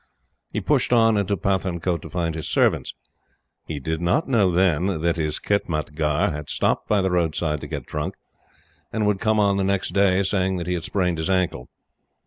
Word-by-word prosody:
He - - -2
pushed - - +1
on 115 -2 +5
into 100 0 0
Pathankote 90 -2 -1
to - - -9
find 85 -3 -2
his 80 0 -5
servants. - - +1 0.7
He 75 -2 -4
did 80 +4 -3
not 90 - +1
know 110 -8 +3
then 90 0 +1
that 85 0 +1
his 75 -2 -2
khitmatgar 80 -1 0
had 75 -1 -6
stopped - - 0
by 105 -3 +3
the 95 - 0
roadside 80 -3 0
to - - -6
get - - -5
drunk, 75 0 -4 0.8
and 110 -1 0
would 105 -2 +1
come 110 0 +2
on 100 -1 +3
the 100 - +1
next 100 0 0
day 100 -1 +3
saying 95 -1 0
that 85 - -4
he 90 - -1
had 85 -2 -3
sprained 90 -3 0
his 80 - -2
ankle. 90 -8 0
90 Hz, 190 wpm, -23 LUFS, 80-100 Hz, 0.8 s, on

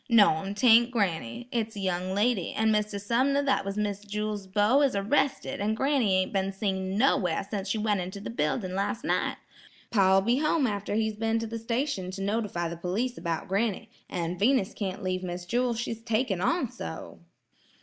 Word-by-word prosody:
"No'm; 200 -4 +4
'taint 235 +1 +6
granny; 195 - -2
it's 225 -2 -2
a - - -5
young 185 0 -1
lady; 205 -3 +1
and 220 0 +2
Mr. 210 -1 0
Sumner 260 +7 +1
that 275 - +1
was 195 +1 -4
Miss 205 -1 -2
Jewel's 210 -1 -3
beau 210 +8 +3
is 275 -6 +2
arrested, 230 +4 0
an' 215 +2 +1
granny 265 -6 +2
ain't 185 0 0
been 195 0 0
seen 190 -1 -2
nowhere 195 -8 +2
since 200 -2 -4
she 220 - 0
went 210 -3 +1
into 185 +3 -6
the 200 - -6
building 185 0 -1
last 200 +3 -2
night. - - 0 0.5
Pa'll 195 -3 +5
be 235 +6 +2
home 305 -1 +2
after 205 -2 -2
he's 220 -1 0
been 225 +1 +1
to 225 - -2
the 230 +1 -5
station 230 -4 -2
to 195 +1 -5
notify 200 -4 -1
the 170 - -5
police 210 +9 -2
about 165 -4 -3
granny, 215 +2 -1 0.2
an' 175 0 -3
Venus 225 -2 +2
can't 195 -2 -4
leave 185 0 -1
Miss 175 -1 -5
Jewel; 240 +4 0
she's 230 -1 -4
taking 225 -4 0
on 345 - +1
so." - - -7
205 Hz, 190 wpm, -28 LUFS, 190-230 Hz, 0.5 s, taint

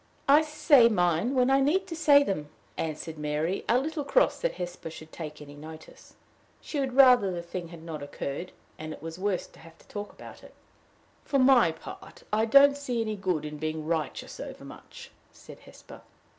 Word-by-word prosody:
"I 285 +3 +7
say 300 -5 +4
mine 180 +5 +1
when 255 0 +3
I 270 - +4
need 320 +8 +2
to 345 -3 -7
say 290 -3 +5
them," 155 - -3 0.3
answered 160 0 -5
Mary, 150 +5 -2
a 240 - +5
little 300 +3 -2
cross - - +2
that - - -1
Hesper 175 -2 -6
should 160 0 -12
take 150 -2 -8
any 145 0 -12
notice. 155 +2 -13 0.4
She 295 - -5
would 265 -2 -2
rather 250 -6 +6
the 175 -1 -5
thing 170 0 -6
had 165 -1 -12
not 160 -3 -7
occurred, 145 +4 -6 0.3
and 155 0 -6
it - - -13
was 165 +2 -7
worse 195 -1 -1
to - - -19
have 165 0 -16
to - - -23
talk 205 0 -7
about - - -13
it. - - -16 0.7
"For 280 - 0
my 255 -9 +5
part, 160 - -12
I 220 +1 +3
don't 280 +4 +6
see 255 -4 -3
any 215 -1 -2
good 180 -6 -2
in 150 0 -6
being 155 0 -4
righteous 160 -1 -3
overmuch," - - -10 0.2
said - - -14
Hesper. - - -15
185 Hz, 190 wpm, -27 LUFS, -, 0.7 s, I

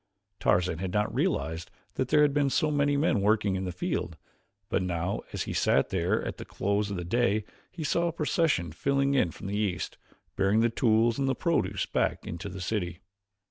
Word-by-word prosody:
Tarzan 90 -2 +2
had 95 0 -3
not 105 +2 0
realized 120 - -1 0.2
that 130 - -1
there 150 - +5
had 145 -1 +3
been 145 -1 +2
so 155 +3 +1
many 145 -1 +2
men 140 -8 +2
working 105 -1 +2
in 95 0 -2
the 90 - -3
field, 85 -1 -3 0.5
but - - 0
now 90 +1 -2
as - - -2
he - - -5
sat 70 - +2
there 90 -2 0
at - - -4
the - - -6
close 100 +1 -1
of 100 - -3
the 90 - -3
day 110 +1 +1 0.3
he 165 - -6
saw 170 +4 +1
a - - 0
procession 155 - +1
filing 140 0 +1
in 130 -11 +3
from 95 - -11
the 100 +1 -2
east, 100 -4 -2 0.4
bearing 100 +3 +3
the 115 0 +3
tools 115 0 +2
and 135 - +1
the 135 - +1
produce 100 - 0
back - - -1
into 90 +5 -5
the 95 0 -7
city. 90 -3 -2
105 Hz, 205 wpm, -28 LUFS, 90-140 Hz, 0.5 s, there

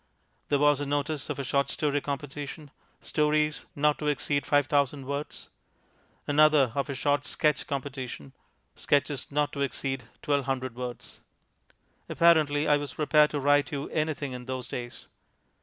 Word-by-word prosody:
There 145 - +2
was 145 0 +3
a 145 - -3
notice 145 +1 -2
of - - -3
a 140 - -3
short 140 +1 +1
story 145 -2 0
competition, 145 +1 -6 0.3
stories 150 0 0
not 150 +1 +2
to 150 - -3
exceed 145 -1 0
5000 145 -1 +2
words; 140 +2 -5 0.8
another 150 -3 +4
of 140 +1 -2
a 140 - -3
short 145 +2 0
sketch 150 -1 +1
competition, 130 - -5 0.4
sketches 145 -2 0
not 145 0 0
to 140 - -4
exceed 135 -2 -2 0.2
1200 135 -3 0
words. 125 -1 -7 0.9
Apparently 155 -3 +4
I 150 - +5
was 145 -2 -6
prepared 150 0 +4
to 145 - -2
write 145 +1 +3
you 140 -1 -4
anything 155 -3 -1
in 125 -1 -7
those 130 -1 -4
days. 120 -1 -7
145 Hz, 145 wpm, -28 LUFS, 135-150 Hz, 0.9 s, I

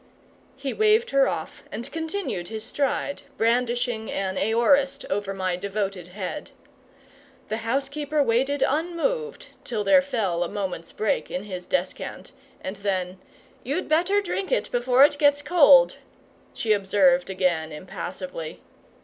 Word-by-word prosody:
He 270 0 -4
waved 435 +2 +3
her 275 -1 +4
off 160 - -4
and 235 +6 -6
continued 320 - -3
his 220 -1 -6
stride, 280 +2 -2 0.2
brandishing 240 -1 0
an 190 -1 -2
aorist 270 +7 +2
over 200 0 -1
my 185 -2 -1
devoted 195 -1 -3
head. 190 +10 -6 1.0
The 215 - -1
housekeeper 280 +5 -1
waited 270 +4 +1
unmoved 355 - -2
till 220 -4 -2
there 275 +8 +6
fell 215 -11 -1
a 170 - -4
moment's 190 -4 -4
break 215 - -1
in 180 - -4
his 185 -3 -7
descant; 275 - -3 0.3
and 190 +2 -5
then, 185 -2 -2 0.4
"You'd 285 +9 -2
better 355 +6 +3
drink 390 +1 -3
it - - 0
before 250 +2 +5
it 290 0 0
gets 290 -1 +4
cold," - - +6 0.5
she 220 -2 +1
observed 190 -3 +3
again, 175 -4 0
impassively. 175 0 -6
235 Hz, 130 wpm, -25 LUFS, 190-285 Hz, 1.0 s, there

